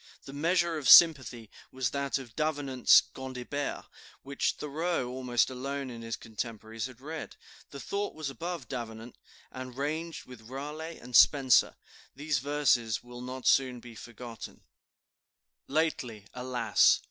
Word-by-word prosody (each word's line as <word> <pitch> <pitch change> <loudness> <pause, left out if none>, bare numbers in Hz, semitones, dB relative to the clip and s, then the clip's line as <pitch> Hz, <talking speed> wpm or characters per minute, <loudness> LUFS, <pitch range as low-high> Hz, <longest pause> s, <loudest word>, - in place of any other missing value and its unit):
The 135 - -9
measure 170 +2 +1
of 140 - 0
"Sympathy" 130 -9 +7 0.2
was 130 -2 -2
that 140 +1 -1
of 120 -5 -10
Davenant's 145 -5 +4
"Gondibert," 130 +2 -5 0.4
which 140 0 -1
Thoreau, 150 -2 -2
almost 125 0 0
alone 135 +1 -4
of 115 -1 -8
his 115 0 -4
contemporaries, 110 0 -6
had 130 -2 -14
read; 155 +3 -7 0.3
the 140 - -9
thought 200 +7 -3
was 155 -2 -4
above 165 -1 -5
Davenant, 115 -1 -7 0.3
and 130 -1 -8
ranged 155 +4 -3
with 120 -3 -13
Raleigh 150 +5 -6
and 125 0 -8
Spenser. 135 -4 +6 0.4
These 145 -1 -1
verses 130 -5 +1
will 120 0 -10
not 130 +1 -7
soon 130 -2 +3
be 120 0 -12
forgotten: 115 0 -10 1.1
"Lately, 135 -8 -1
alas! 125 -3 +3
130 Hz, 135 wpm, -29 LUFS, 120-145 Hz, 1.1 s, Sympathy